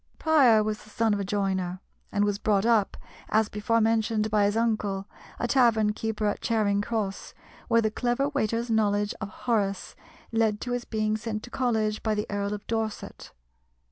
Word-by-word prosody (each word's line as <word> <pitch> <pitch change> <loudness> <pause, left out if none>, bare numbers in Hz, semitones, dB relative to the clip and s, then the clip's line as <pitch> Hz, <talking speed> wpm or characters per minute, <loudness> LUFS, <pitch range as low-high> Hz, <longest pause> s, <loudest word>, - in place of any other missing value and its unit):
Prior 265 -9 +5
was 215 0 -3
the 215 - -17
son 225 0 +1
of 205 - -1
a - - -1
joiner, 190 -2 -1 0.3
and 205 0 +2
was 205 -1 -1
brought 205 -1 +1
up, 225 -4 +2 0.3
as 220 0 +2
before 210 +2 0
mentioned, 220 -1 +1
by 210 -1 +3
his 205 +2 +1
uncle, 210 -4 0 0.3
a 240 - -1
tavern 230 -4 +3
keeper 220 0 -3
at 205 - -1
Charing 205 -3 +1
Cross, 205 -3 -3 0.3
where 230 -1 +3
the 215 - +1
clever 245 +4 0
waiter's 230 -4 -1
knowledge 205 -2 +1
of 215 - -4
Horace 205 -4 -2 0.4
led 220 -2 +1
to 245 - -4
his 245 -1 -2
being 215 -1 -1
sent 215 0 -4
to 245 - -10
college 220 -4 0
by 220 -1 0
the 210 +1 -1
Earl 205 0 -1
of 205 - -10
Dorset. 225 -2 -4
215 Hz, 180 wpm, -27 LUFS, 205-230 Hz, 0.4 s, Prior